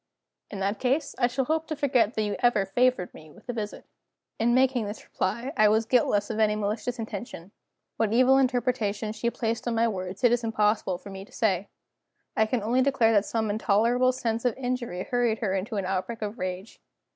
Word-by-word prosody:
"In 200 - -6
that 200 +2 -1
case, 275 +4 0
I 245 - +4
shall 260 +2 -1
hope 315 +3 -1
to 310 - -3
forget 250 -6 +2
that 220 - 0
you 205 -1 -2
ever 240 -5 +3
favored 245 -1 +1
me 155 - -13
with 150 - -18
a 245 - -3
visit." 215 -3 -5 0.5
In 240 +2 +3
making 255 -4 +2
this 205 +1 -7
reply 235 +9 -3
I 215 -3 +5
was 220 +1 +2
guiltless 215 -3 +2
of 220 - -3
any 210 -1 +3
malicious 215 +4 -2
intention. 205 -5 -7 0.5
What 220 -2 +1
evil 255 +3 +5
interpretation 245 -5 0
she 225 +2 -1
placed 230 0 -3
on 235 - 0
my 230 +1 +3
words 185 -2 -5
it 245 - +6
is 240 0 +1
impossible 210 -4 +1
for 200 +2 -11
me 195 0 -7
to 220 - -18
say; 200 -5 0 0.7
I 220 - +3
can 230 -2 -1
only 240 +4 +2
declare 255 -4 +3
that 205 -2 +3
some 220 -1 -1
intolerable 230 +4 +2
sense 230 -3 -2
of 245 -2 0
injury 245 -8 -3
hurried 240 -2 0
her 205 -4 -1
into 200 +4 -3
an 200 -2 -1
outbreak 195 +5 -3
of 210 +3 -5
rage. 185 +3 -5
225 Hz, 205 wpm, -27 LUFS, 205-245 Hz, 0.7 s, it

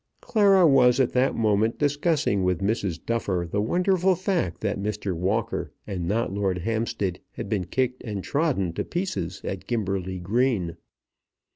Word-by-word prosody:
Clara 200 -4 +4
was 130 -4 +5
at 130 - +3
that 130 +2 +2
moment 110 0 +2
discussing 145 - +1
with 90 -2 +1
Mrs. 100 -3 -1
Duffer 100 -7 -1
the 100 +5 -1
wonderful 180 - +2
fact 175 - -1
that 105 -2 -1
Mr. 105 -1 -2
Walker 105 +7 -1
and 90 -5 -4
not 110 0 0
Lord 100 -2 0
Hampstead 110 -2 -2
had - - -6
been 100 -4 0
kicked 130 +6 -1
and 105 -5 -4
trodden 135 - 0
to - - -2
pieces 170 - -3
at - - -5
Gimberley 95 -5 -2
Green. 100 -2 0
110 Hz, 150 wpm, -25 LUFS, 95-135 Hz, -, was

